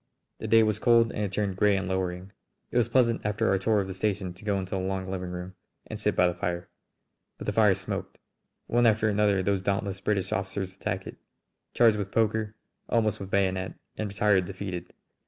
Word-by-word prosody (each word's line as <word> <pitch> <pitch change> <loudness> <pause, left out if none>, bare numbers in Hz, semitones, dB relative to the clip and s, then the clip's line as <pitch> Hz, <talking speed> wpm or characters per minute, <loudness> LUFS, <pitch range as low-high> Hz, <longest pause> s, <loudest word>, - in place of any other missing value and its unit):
The 110 - -4
day 115 +1 +6
was 110 -1 +1
cold 115 -1 +4
and - - -4
had 100 -2 -1
turned 100 -2 -1
grey 105 0 +4
and 95 -1 -2
lowering. 95 0 -3 0.4
It - - 0
was 120 -1 +3
pleasant 120 -2 +2
after 105 +2 0
our 95 - +2
tour 105 +1 +2
of - - -3
the 95 - -5
station 95 -1 -2
to 90 - -16
go 100 -2 0
into 95 -1 -5
the 95 - -1
long 95 0 -2
living 90 -1 -4
room 90 +1 -6 0.3
and - - -7
sit - - 0
by 90 - +4
the 90 - +2
fire. 90 0 -3 0.7
But - - -8
the - - -1
fire - - +5
smoked. - - -5 0.5
One 120 0 +3
after 110 0 +3
another 100 -2 +2
those 100 0 +1
dauntless 100 0 -2
British 100 -3 0
officers 95 -1 -3
attacked - - -3
it, - - -9 0.6
charged 115 -3 +5
with 100 -2 -3
poker, 110 -1 0 0.3
almost 110 -3 +1
with 95 - -7
bayonet, 95 -1 0 0.2
and 110 - -3
retired 100 -2 +2
defeated. 90 -2 -6
100 Hz, 210 wpm, -27 LUFS, 95-105 Hz, 0.7 s, day